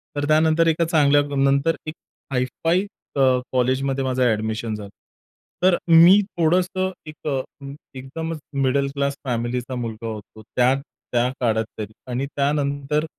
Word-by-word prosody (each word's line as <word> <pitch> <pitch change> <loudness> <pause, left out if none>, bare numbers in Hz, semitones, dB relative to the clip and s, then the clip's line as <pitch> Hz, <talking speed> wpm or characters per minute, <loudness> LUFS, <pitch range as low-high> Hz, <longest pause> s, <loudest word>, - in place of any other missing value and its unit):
तर 145 - -1
त्यानंतर 160 +2 +3
एका 165 +1 +2
चांगल्यानंतर 145 -1 +3
एक 155 - -3 0.4
हाय 125 0 +2 0.2
फाय 170 +3 +3 0.3
अ, - - -1 0.3
कॉलेजमध्ये 130 +2 0
माझं 130 -1 -1
अ‍ॅडमिशन 110 -1 -1
झालं. 105 -1 -8 0.7
तर 185 -2 +5
मी 170 +4 +8 0.2
थोडंसं 180 +3 +1 0.2
एक 155 0 -9
अ, 135 -2 0 0.6
एकदमच 160 +5 -5 0.2
मिडल 140 +1 +2
क्लास 140 0 0
फॅमिलीचा 125 +1 -2
मुलगा 115 -2 -5
होतो. 110 0 -8
त्या 125 +1 +4 0.4
त्या 120 0 +2
काळात 110 -2 +1
तरी 110 0 -5 0.2
आणि 130 +3 -1
त्यानंतर 145 +1 0
140 Hz, 130 wpm, -22 LUFS, 125-155 Hz, 0.7 s, मी